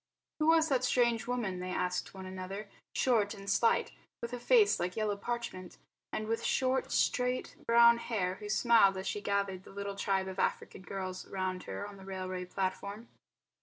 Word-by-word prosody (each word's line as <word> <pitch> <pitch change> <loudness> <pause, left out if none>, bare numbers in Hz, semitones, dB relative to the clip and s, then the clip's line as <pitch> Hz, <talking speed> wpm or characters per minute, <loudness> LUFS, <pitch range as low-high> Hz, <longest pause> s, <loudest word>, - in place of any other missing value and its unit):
Who 305 - +2
was 325 0 +5
that 260 -3 +2
strange 240 -2 +2
woman 230 -7 -2
(they 180 0 -4
asked 180 +1 -2
one 190 0 -7
another), 190 +2 -6 0.3
short 220 -6 +2
and 195 0 -11
slight, 200 +4 +2 0.3
with 235 +1 -4
a 245 - -3
face 430 - +4
like 180 +1 -2
yellow 215 -2 0
parchment 200 -4 -5 0.3
and 215 - -2
with 225 +1 -1
short, 260 0 +1
straight 250 0 +1
brown 235 0 +7
hair, 190 -6 -2
who 210 -1 -7
smiled 215 -3 +5
as 190 - -5
she 205 - -2
gathered 200 -2 -1
the - - -15
little 200 0 -5
tribe 195 -1 0
of 190 0 -6
African - - -1
girls 185 -1 -5
round 185 -1 -3
her 205 - -5
on 205 -1 -11
the 195 - -12
railway 185 -1 -4
platform? 200 +4 -4
200 Hz, 180 wpm, -32 LUFS, 190-235 Hz, 0.3 s, brown